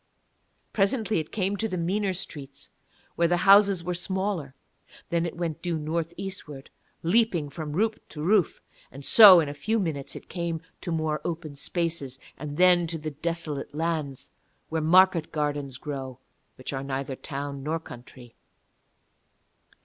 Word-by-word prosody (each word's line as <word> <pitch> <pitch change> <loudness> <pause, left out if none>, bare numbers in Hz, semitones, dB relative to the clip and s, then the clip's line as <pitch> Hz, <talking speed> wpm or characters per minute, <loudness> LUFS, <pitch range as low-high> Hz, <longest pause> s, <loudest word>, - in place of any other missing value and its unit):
Presently 210 -1 +1
it 155 - -6
came 200 -1 -1
to 225 - -1
the 185 - -3
meaner 190 +4 0
streets, 140 -6 -7 0.4
where 170 - +3
the 175 +1 +2
houses 200 -2 +6
are 180 - -1
smaller. 180 -5 -3 0.6
Then 170 0 +1
it 170 - -8
went 165 -2 -3
due 175 -2 -1
north 165 +2 -3
eastwards, 185 -8 -7 0.3
leaping 175 -5 +2
from 150 0 -6
roof 215 +6 0
to 150 - -7
roof. 190 -1 +2 0.3
And 135 +1 -8
so 200 -5 +10
in 155 - 0
a 145 - -4
few 215 +11 -1
minutes 155 -8 -3
it - - -10
came 170 -2 -3 0.2
to 175 - -4
more 155 -2 -1
open 160 -3 -5
spaces, 160 -4 -3 0.2
and 150 -1 -7
then 180 -1 +5
to 165 0 -3
the 155 0 -5
desolate 155 -2 -4
lands, 155 -4 -2 0.4
where 160 0 -1
market 175 +1 +4
gardens 145 -3 -2
grow, 135 -3 -6 0.4
which 130 - -6
are 135 - -3
neither 135 0 -3
town 140 0 -5
nor 155 +4 -2
country. 125 -4 -12
165 Hz, 155 wpm, -26 LUFS, 145-180 Hz, 0.6 s, so